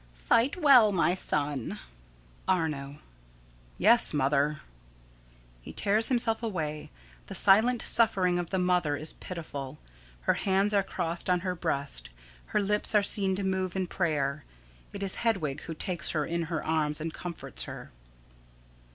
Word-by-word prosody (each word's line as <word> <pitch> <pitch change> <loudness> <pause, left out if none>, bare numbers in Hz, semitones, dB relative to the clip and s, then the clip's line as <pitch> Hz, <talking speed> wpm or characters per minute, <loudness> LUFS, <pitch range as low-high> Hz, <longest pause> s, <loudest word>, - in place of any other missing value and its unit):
_] - - -27
Fight 230 - +2
well, 260 -9 +7
my 175 -2 +2
son. 145 -7 -2 0.7
Arno: 150 -6 -1 0.8
Yes, 225 -4 +5
Mother. 145 +2 +1 1.0
[_He - - -10
tears 215 +2 +1
himself 235 -3 +1
away. 160 -9 -4 0.4
The - - -7
silent 220 +5 +4
suffering 185 -6 +3
of 175 -1 -4
the 190 - -1
mother 180 -5 +1
is 155 +2 -5
pitiful. 145 -7 -7 0.4
Her - - +2
hands 195 +2 +1
are 200 - +4
crossed 170 -2 -4
on 180 -1 +2
her 185 0 -2
breast, 140 - -2 0.4
her - - 0
lips 210 +2 +1
are 210 - +5
seen 195 -2 +1
to 200 - -3
move 190 -1 -1
in 190 -1 0
prayer. 150 -6 -1 0.5
It 200 - -6
is 195 - +2
Hedwig 185 -12 -1
who 165 - -6
takes 170 0 -1
her 150 - 0
in 170 +1 -2
her 160 -2 -2
arms 155 -1 +1
and 160 +1 -4
comforts 165 - -4
her. - - -9
175 Hz, 150 wpm, -28 LUFS, 150-200 Hz, 1.0 s, well